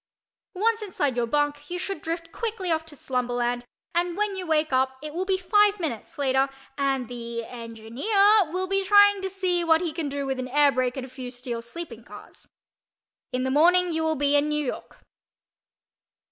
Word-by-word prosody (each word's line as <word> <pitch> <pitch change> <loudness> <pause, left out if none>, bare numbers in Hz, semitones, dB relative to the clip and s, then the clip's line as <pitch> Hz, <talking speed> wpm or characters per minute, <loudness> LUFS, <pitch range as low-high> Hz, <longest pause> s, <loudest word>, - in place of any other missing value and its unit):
Once 445 +4 +1
inside 295 - -1
your 240 -1 0
"bunk" 290 +2 -1
you 355 - -3
should 375 -2 -4
drift 330 +1 -4
quickly 420 -5 -3
off 320 0 0
to 305 - -11
slumberland, 245 -2 -1 0.3
and 345 +1 0
when 420 -1 0
you 375 -2 -5
wake 310 -2 +1
up 260 0 +1
it 305 -1 -6
will 365 +3 -2
be 380 -1 +1
five 410 +2 +3
minutes 290 -11 -5
later 270 -1 +2 0.3
and 270 -3 0
the————engineer 240 - 0
will 370 +2 -1
be 390 +1 0
trying 405 0 +6
to 385 - -2
see 365 -2 0
what 320 -1 +4
he 335 -3 -3
can 315 -3 -3
do 280 0 -3
with 265 -1 -2
an 255 - -3
air 285 +2 +4
brake 255 0 -1
and 260 - -4
a - - -10
few 255 -1 -7
steel 245 -1 -5
sleeping 235 -2 -8
cars. - - -13 0.8
In 255 0 -1
the 260 - 0
morning 350 +5 +4
you 320 0 -1
will 320 0 +1
be 285 0 +2
in 290 +1 +3
New 300 -1 -1
York. - - -7
300 Hz, 190 wpm, -25 LUFS, 255-365 Hz, 0.8 s, trying